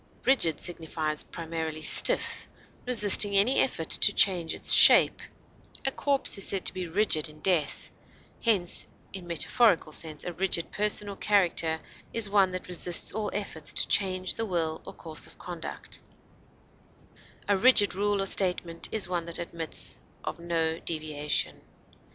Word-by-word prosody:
Rigid 170 - +3
signifies 160 -3 -3
primarily 160 -2 -6
stiff, - - +2 0.4
resisting 205 -4 +5
any 220 +7 +4
effort 165 -11 -1
to - - +3
change 180 -5 +2
its - - 0
shape; - - +6 0.6
a 270 - 0
corpse 275 -6 0
is 195 - +1
said 195 -2 -3
to - - +3
be 185 -1 -6
rigid 165 -4 +1
in 155 0 -15
death; 170 -6 -2 0.5
hence, 200 -7 -1 0.3
in 185 -3 -7
metaphorical 175 +1 +2
sense, 155 -1 -6
a 175 - -6
rigid 175 -2 -2
person 210 0 -1
or 200 - -7
character 175 -6 +1 0.3
is 230 -2 +1
one 200 -2 +2
that 185 0 -7
resists 175 -1 +1
all 210 0 -3
efforts 160 -7 -3
to - - 0
change 185 -2 +1
the 225 - -4
will 165 -4 -2
or - - -9
course 160 -2 -6
of - - -18
conduct; 175 -2 -8 1.5
a 205 - +2
rigid 210 0 +4
rule 205 0 -1
or - - -3
statement 180 -3 0
is 215 -5 +1
one 175 -2 -4
that 170 - +3
admits 170 -1 -3 0.2
of - - -6
no 165 -1 -2
deviation. 155 -2 -2
180 Hz, 150 wpm, -26 LUFS, 165-205 Hz, 1.5 s, shape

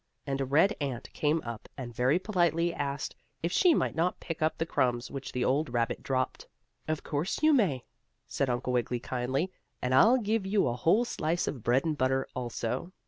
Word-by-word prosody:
And 135 -1 -2
a - - 0
red 160 +10 +3
ant 135 -4 -4
came 155 +2 +1
up, 115 -2 -7
and 125 -3 -6
very 125 +7 +3
politely 175 -3 +1
asked 140 -2 -3 0.3
if 170 - 0
she 345 - +5
might - - 0
not 170 +3 0
pick 165 -2 -6
up 155 0 +1
the 165 - -1
crumbs 125 -5 0
which 135 -1 -6
the 125 -1 -1
old 140 +3 +1
rabbit 120 -1 0
dropped. 130 -1 -2 0.4
"Of 155 -1 -2
course 160 - -2
you 310 0 +6
may," 180 - +2 0.4
said 135 - -1
Uncle 125 +1 -1
Wiggily 125 0 0
kindly. 130 +9 -2 0.3
"And 125 0 -1
I'll 220 - +6
give 220 -2 0
you 200 -4 +2
a 120 - 0
whole 170 - +3
slice 170 -6 -1
of 130 - -3
bread 125 +6 +2
and 160 -2 0
butter, 130 -1 +1
also." 125 +5 -3
140 Hz, 195 wpm, -29 LUFS, 125-170 Hz, 0.4 s, you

